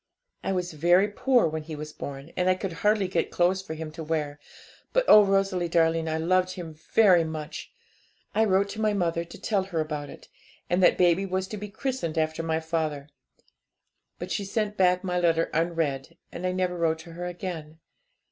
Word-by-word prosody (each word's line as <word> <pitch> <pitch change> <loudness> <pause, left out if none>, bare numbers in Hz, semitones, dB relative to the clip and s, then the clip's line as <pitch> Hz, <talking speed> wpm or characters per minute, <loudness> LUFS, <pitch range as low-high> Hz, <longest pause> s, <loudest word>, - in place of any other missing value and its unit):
I - - -1
was 180 -2 -2
very, 175 +5 +4
very 205 - -7
poor 255 -6 +3
when 160 0 -3
he 155 0 -7
was 150 0 -7
born, 140 +3 -8
and 180 0 +1
I 185 - +4
could 185 -1 -4
hardly 210 +3 +1
get 185 - -1
clothes 180 +2 +1
for 160 -4 -7
him 160 0 -6
to 160 +1 -7
wear, 150 -2 -2 0.5
but - - +3
oh, 210 - +9
Rosalie 195 -3 +1
darling, 165 -1 +2
I 160 - -1
loved 185 +3 +1
him 170 -3 -7
very 175 +3 +4
much! 155 -2 -6 0.6
I 220 - +3
wrote 195 -1 +2
to 220 - -5
my 215 -1 +2
mother 170 -4 0
to 170 - -12
tell 200 -4 0
her 175 -4 -3
about 150 -2 -3
it, - - -12 0.4
and 180 +1 +2
that 180 - +5
baby 180 +2 +3
was 185 0 -1
to - - -5
be 210 +1 -6
christened 225 - -3
after 160 0 0
my 160 -1 -1
father; 160 -3 -3 1.1
but - - -6
she 205 - -1
sent 210 +1 -2
back 180 -1 +3
my 180 -1 -1
letter 165 -1 +2
unread, 160 -5 -1
and 185 - -4
I - - 0
never 185 -1 -1
wrote 165 -2 +1
to 170 - -12
her 175 +1 -5
again. 170 -3 -6
175 Hz, 205 wpm, -26 LUFS, 160-190 Hz, 1.1 s, oh